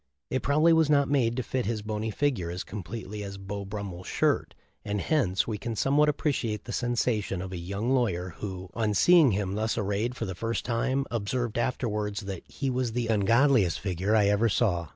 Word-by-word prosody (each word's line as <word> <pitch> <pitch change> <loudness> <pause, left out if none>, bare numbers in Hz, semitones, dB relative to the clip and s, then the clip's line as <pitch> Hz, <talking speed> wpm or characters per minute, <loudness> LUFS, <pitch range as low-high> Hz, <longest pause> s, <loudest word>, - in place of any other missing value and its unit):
It 130 - 0
probably 155 +4 +4
was 160 -2 +4
not 140 -2 +3
made 125 -4 +2
to 130 - -1
fit 125 0 -2
his 110 -2 -2
bony 110 +1 -3
figure 110 -7 0
as 90 +1 -4
completely 105 +1 -6
as 100 -1 -6
Beau 100 +1 -6
Brummel's 100 -3 -6
shirt, - - 0 0.3
and 105 -1 -2
hence 100 - +1
we 105 -3 -3
can 115 +1 -4
somewhat 145 +6 +3
appreciate 130 -7 -1
the 120 - -7
sensation 120 -6 0
of 95 +1 -5
a 90 - -4
young 100 +8 -3
lawyer 95 -9 +1
who, 95 -3 -6
on 110 -2 0
seeing 170 - +6
him 95 -1 -1
thus 110 +2 -1
arrayed 105 +3 -1
for 115 - -3
the 95 - -4
first 115 +6 -3
time, 130 +3 0
observed 120 +1 -1
afterwards 105 -4 -1
that, 95 -3 -6
"He 140 - -4
was 125 -2 -1
the 120 -1 -1
ungodliest 115 - +3
figure 95 +2 0
I 105 -2 +4
ever 105 +3 +3
saw." 90 -6 +1
110 Hz, 195 wpm, -28 LUFS, 100-125 Hz, 0.3 s, seeing